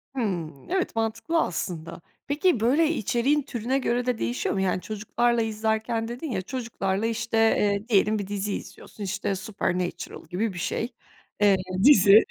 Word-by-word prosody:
Hıı. 185 Hz, -10 st, -1 dB, 0.2 s
Evet, 370 Hz, -9 st, -1 dB
mantıklı 225 Hz, +9 st, 0 dB
aslında. 165 Hz, -1 st, -4 dB, 0.3 s
Peki, 290 Hz, -, +2 dB
böyle, 290 Hz, +8 st, +3 dB
içeriğin 275 Hz, -, +1 dB
türüne 260 Hz, -1 st, -2 dB
göre 245 Hz, -1 st, 0 dB
de 250 Hz, -3 st, 0 dB
değişiyor 240 Hz, -3 st, -1 dB
mu? 190 Hz, -, 0 dB
Yani, 185 Hz, -1 st, 0 dB
çocuklarla 230 Hz, +3 st, 0 dB
izlerken 220 Hz, +1 st, -1 dB
dedin 250 Hz, +4 st, -5 dB
ya, 190 Hz, -, -1 dB
çocuklarla, 220 Hz, -3 st, -2 dB
işte, 230 Hz, 0 st, -1 dB
eee, 210 Hz, -1 st, +2 dB
diyelim 215 Hz, +1 st, +3 dB
bir 200 Hz, -, -4 dB
dizi 205 Hz, 0 st, -2 dB
izliyorsun. 210 Hz, -, -8 dB
İşte, 200 Hz, 0 st, -2 dB
Supernatural 180 Hz, -4 st, -3 dB
gibi 190 Hz, +4 st, -1 dB
bir 175 Hz, -, -6 dB
şey, 230 Hz, +7 st, -2 dB, 0.5 s
eee, 205 Hz, -2 st, +6 dB, 0.3 s
dizi 205 Hz, -6 st, +8 dB
220 Hz, 150 wpm, -26 LUFS, 195-240 Hz, 0.5 s, dizi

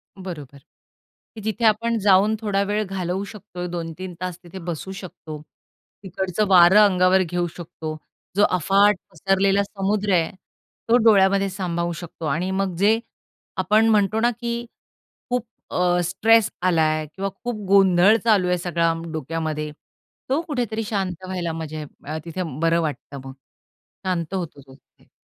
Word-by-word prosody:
बरोबर, 155 Hz, -8 st, -8 dB, 0.8 s
की 220 Hz, -, -8 dB
जिथे 220 Hz, +2 st, -1 dB
आपण 230 Hz, +2 st, +2 dB
जाऊन 200 Hz, +2 st, +4 dB
थोडा 200 Hz, -2 st, 0 dB
वेळ 210 Hz, +1 st, 0 dB
घालवू 190 Hz, 0 st, -3 dB
शकतो, 200 Hz, -4 st, -8 dB
2-3 175 Hz, +2 st, -5 dB
तास 180 Hz, -2 st, -4 dB
तिथे 175 Hz, +2 st, -9 dB
बसू 170 Hz, +3 st, -5 dB
शकतो. 165 Hz, -5 st, -9 dB, 0.6 s
तिकडचं 190 Hz, +2 st, -2 dB
वारं 185 Hz, +1 st, +7 dB
अंगावर 185 Hz, -1 st, +4 dB
घेऊ 175 Hz, 0 st, -2 dB
शकतो 160 Hz, -2 st, -7 dB, 0.4 s
जो 205 Hz, -, +4 dB
अफाट 195 Hz, +4 st, +4 dB, 0.2 s
पसरलेला 195 Hz, +3 st, +2 dB
समुद्र 200 Hz, 0 st, -1 dB
आहे 165 Hz, -2 st, +2 dB, 0.6 s
तो 240 Hz, -, +6 dB
डोळ्यामध्ये 195 Hz, -2 st, +5 dB
सामावू 175 Hz, -3 st, -2 dB
शकतो. 165 Hz, -1 st, -8 dB
आणि 165 Hz, +5 st, -1 dB
मग 190 Hz, -2 st, -1 dB
जे 215 Hz, +4 st, +3 dB, 0.6 s
आपण 220 Hz, +2 st, +3 dB
म्हणतो 215 Hz, 0 st, +2 dB
ना 240 Hz, +2 st, +3 dB
की 235 Hz, 0 st, -3 dB, 0.6 s
खूप 245 Hz, -1 st, -1 dB, 0.3 s
अ, 180 Hz, 0 st, +2 dB
स्ट्रेस 225 Hz, +5 st, +3 dB
आला 180 Hz, -3 st, +2 dB
आहे 155 Hz, 0 st, +1 dB
किंवा 195 Hz, +1 st, -2 dB
खूप 230 Hz, -4 st, -4 dB
गोंधळ 195 Hz, +1 st, +5 dB
चालू 205 Hz, -6 st, +3 dB
आहे 180 Hz, -, +2 dB
सगळा 170 Hz, -1 st, 0 dB, 0.2 s
डोक्यामध्ये. 155 Hz, 0 st, -3 dB, 0.6 s
तो 275 Hz, +5 st, +2 dB
कुठेतरी 235 Hz, -6 st, -2 dB
शांत 190 Hz, -4 st, -3 dB
व्हायला 180 Hz, -3 st, -3 dB
म्हणजे 155 Hz, -1 st, -5 dB, 0.2 s
अ, 155 Hz, +2 st, -3 dB
तिथे 170 Hz, +2 st, -4 dB, 0.2 s
बरं 165 Hz, 0 st, +3 dB
वाटतं 150 Hz, -2 st, -5 dB
मग. 135 Hz, -, -8 dB, 0.7 s
शांत 180 Hz, -1 st, -2 dB
होतो 170 Hz, -6 st, -4 dB
तो 135 Hz, -1 st, -17 dB
तिथे. -, -, -29 dB
185 Hz, 145 wpm, -23 LUFS, 170-205 Hz, 0.8 s, वारं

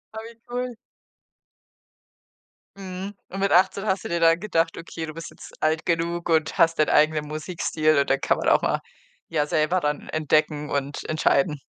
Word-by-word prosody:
Oh -, -, -4 dB
wie 235 Hz, -, -15 dB
cool. 245 Hz, 0 st, -3 dB, 2.0 s
Mhm. 190 Hz, +1 st, -6 dB, 0.2 s
Und 195 Hz, -, -6 dB
mit 195 Hz, 0 st, +1 dB
18 190 Hz, +3 st, +3 dB
hast 190 Hz, -2 st, 0 dB
du -, -, -5 dB
dir 170 Hz, -, 0 dB
dann 165 Hz, 0 st, +4 dB
gedacht: 165 Hz, -5 st, 0 dB
„Okay, 165 Hz, -1 st, -6 dB
du 155 Hz, -, -8 dB
bist 165 Hz, +1 st, -8 dB
jetzt -, -, -13 dB
alt 155 Hz, +1 st, +1 dB
genug 170 Hz, +1 st, -1 dB
und 160 Hz, -1 st, +1 dB
hast 165 Hz, -1 st, +3 dB
deinen 155 Hz, -, +3 dB
eigenen 155 Hz, 0 st, +3 dB
Musikstil“ 155 Hz, 0 st, 0 dB
und 140 Hz, -, +1 dB
dann 135 Hz, -, +2 dB
kann -, -, +1 dB
man -, -, +1 dB
auch -, -, +4 dB
mal, -, -, +1 dB, 0.5 s
ja, 150 Hz, -3 st, +1 dB
selber 155 Hz, +4 st, +1 dB
dann 150 Hz, -3 st, -3 dB
entdecken 155 Hz, -1 st, 0 dB
und 140 Hz, 0 st, -3 dB
entscheiden. 155 Hz, 0 st, +1 dB
165 Hz, 180 wpm, -24 LUFS, 155-180 Hz, 2.0 s, dann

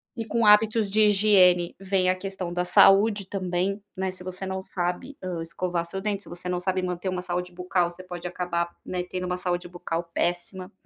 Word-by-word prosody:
E 230 Hz, -, -4 dB
com 230 Hz, +1 st, 0 dB
hábitos 210 Hz, 0 st, +5 dB
de 215 Hz, +2 st, +3 dB
higiene 190 Hz, -4 st, +4 dB
vem 190 Hz, -1 st, +1 dB
a 185 Hz, -, +3 dB
questão 185 Hz, -2 st, -5 dB
da 180 Hz, 0 st, 0 dB
saúde 200 Hz, +3 st, +5 dB
também, 190 Hz, +1 st, -2 dB, 0.2 s
né, 190 Hz, 0 st, -1 dB
se 185 Hz, 0 st, -8 dB
você 185 Hz, +1 st, -5 dB
não 190 Hz, 0 st, -3 dB
sabe, 180 Hz, +9 st, -3 dB
ah, 180 Hz, -3 st, -3 dB
escovar 170 Hz, +1 st, -2 dB
seu 180 Hz, +3 st, -5 dB
dente, 205 Hz, 0 st, -2 dB
se -, -, -14 dB
você 175 Hz, +1 st, -7 dB
não 180 Hz, 0 st, -1 dB
sabe 185 Hz, 0 st, -1 dB
manter 180 Hz, +1 st, -2 dB
uma 185 Hz, -1 st, -2 dB
saúde 180 Hz, 0 st, -3 dB
bucal, 180 Hz, 0 st, 0 dB
você 180 Hz, +1 st, -12 dB
pode 180 Hz, -1 st, -6 dB
acabar, 170 Hz, -1 st, -3 dB
né, 180 Hz, -1 st, -3 dB
tendo 180 Hz, 0 st, -5 dB
uma 180 Hz, 0 st, -2 dB
saúde 180 Hz, -1 st, -2 dB
bucal 175 Hz, -1 st, -4 dB
péssima. 180 Hz, +2 st, -2 dB
185 Hz, 205 wpm, -26 LUFS, 175-195 Hz, 0.2 s, hábitos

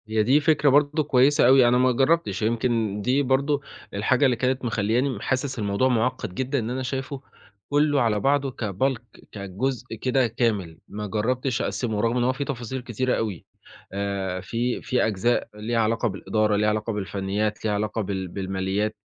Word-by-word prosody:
هي 110 Hz, 0 st, +1 dB
دي 130 Hz, +7 st, +4 dB
فكرة 150 Hz, -1 st, +3 dB
برضه 145 Hz, +2 st, +3 dB
كويسة 135 Hz, -1 st, +4 dB
أوي، 130 Hz, -1 st, +6 dB
أنا 120 Hz, +1 st, +4 dB
ما 130 Hz, 0 st, +4 dB
جرّبتش 130 Hz, -, +1 dB
يمكن 110 Hz, -2 st, 0 dB
دي 130 Hz, +6 st, +2 dB
برضه 140 Hz, +2 st, +1 dB, 0.3 s
الحاجة 125 Hz, +7 st, +2 dB
اللي 125 Hz, -2 st, +3 dB
كانت 130 Hz, +2 st, -1 dB
مخلياني 115 Hz, +2 st, 0 dB
حاسس 130 Hz, -1 st, -2 dB
الموضوع 100 Hz, +4 st, +1 dB
معقّد 125 Hz, -5 st, -1 dB
جدًا 130 Hz, +4 st, -1 dB
إن 115 Hz, -1 st, -3 dB
أنا 130 Hz, +1 st, -3 dB
شايفُه 135 Hz, +1 st, -4 dB, 0.5 s
كلُّه 145 Hz, 0 st, +3 dB
على 110 Hz, -3 st, +1 dB
بعضه 135 Hz, +2 st, +1 dB
كBulk 120 Hz, +3 st, -2 dB
كجزء 110 Hz, +5 st, -4 dB
كده 130 Hz, -1 st, +2 dB
كامل، 105 Hz, -8 st, -1 dB
ما 105 Hz, +1 st, -6 dB
جرّبتش 125 Hz, +4 st, -1 dB
أقسِّمه 110 Hz, -4 st, -2 dB
رغم 115 Hz, +2 st, +1 dB
إن 120 Hz, -, +1 dB
هو 130 Hz, +1 st, +2 dB
فيه 140 Hz, +2 st, -4 dB
تفاصيل 130 Hz, -2 st, -4 dB
كتيرة 125 Hz, +1 st, -1 dB
أوي 105 Hz, -6 st, -3 dB, 0.5 s
آآ، 100 Hz, -2 st, -2 dB
في 120 Hz, +6 st, -2 dB
في 125 Hz, -, +1 dB
أجزاء 110 Hz, +3 st, 0 dB
ليها 115 Hz, +2 st, -2 dB
علاقة 115 Hz, +2 st, +1 dB
بالإدارة، 105 Hz, +1 st, 0 dB
ليها 105 Hz, +1 st, +2 dB
علاقة 110 Hz, +1 st, -1 dB
بالفنيات 100 Hz, +2 st, -2 dB
ليها 105 Hz, -, +1 dB
علاقة 105 Hz, +2 st, -1 dB
بال 95 Hz, -2 st, -3 dB
بالماليات، 95 Hz, +3 st, -2 dB
120 Hz, 170 wpm, -24 LUFS, 105-130 Hz, 0.5 s, أوي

